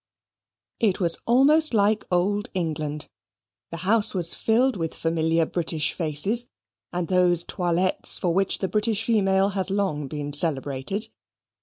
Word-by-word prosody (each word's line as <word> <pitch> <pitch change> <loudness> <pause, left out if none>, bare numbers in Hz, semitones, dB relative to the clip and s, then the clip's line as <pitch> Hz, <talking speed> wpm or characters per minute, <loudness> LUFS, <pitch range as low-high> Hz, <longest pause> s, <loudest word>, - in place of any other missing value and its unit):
It 210 -5 +1
was 170 -3 +3
almost 280 +4 +4
like 210 +1 +2
Old 200 +4 0
England. 155 -4 -3 0.6
The 165 - -7
house 210 0 +2
was 170 -2 0
filled 245 +4 +1
with 165 -4 -4
familiar 165 0 0
British 160 -2 -2
faces, 180 +9 0 0.4
and 175 -1 -3
those 180 -1 +3
toilettes 180 +1 0
for 175 -2 0
which 195 +2 +1
the 190 - -2
British 215 +2 0
female 195 -4 +2
has 190 -1 +1
long 190 -8 -2
been 145 +1 -6
celebrated. 145 - -1
185 Hz, 135 wpm, -24 LUFS, 165-205 Hz, 0.6 s, almost